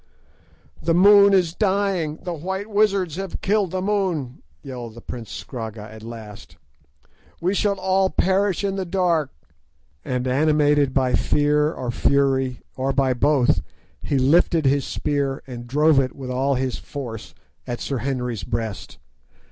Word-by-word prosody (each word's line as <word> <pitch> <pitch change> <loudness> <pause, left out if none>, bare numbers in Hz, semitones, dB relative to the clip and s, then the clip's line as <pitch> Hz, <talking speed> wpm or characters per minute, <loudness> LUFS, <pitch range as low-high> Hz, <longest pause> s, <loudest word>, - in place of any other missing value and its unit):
"The 165 0 +1
moon 200 +2 +7
is 180 -4 +3
dying—the 190 -5 -1
white 190 +5 -4
wizards 200 -6 +1
have 195 -2 -5
killed 205 -1 +1
the 185 +1 -3
moon," 185 -11 -1 0.2
yelled 120 -4 -7
the - - -10
prince 115 -2 -8
Scragga 110 -4 -7
at 110 - -11
last. 110 -2 -10 0.8
"We 180 +3 0
shall 200 -1 0
all 190 0 +2
perish 190 +1 +1
in 195 -1 -1
the 190 - -1
dark," 170 -5 +1 0.7
and 125 0 -2
animated 145 0 +3
by 130 -2 +1
fear 150 +4 +2
or 125 -6 -4
fury, 135 0 +1
or 135 +1 -1
by 135 -2 +2
both, 125 - +2 0.4
he 140 - -1
lifted 155 +4 +3
his 135 0 +2
spear 140 -2 -2
and 120 -2 -8
drove 150 +3 +4
it 130 -2 -1
with 130 -2 -6
all 135 +2 +1
his 130 -1 -2
force 115 - -7 0.3
at 120 -1 -4
Sir 135 -3 -3
Henry's 125 -4 -3
breast. 115 -2 -4
145 Hz, 145 wpm, -22 LUFS, 125-185 Hz, 0.8 s, moon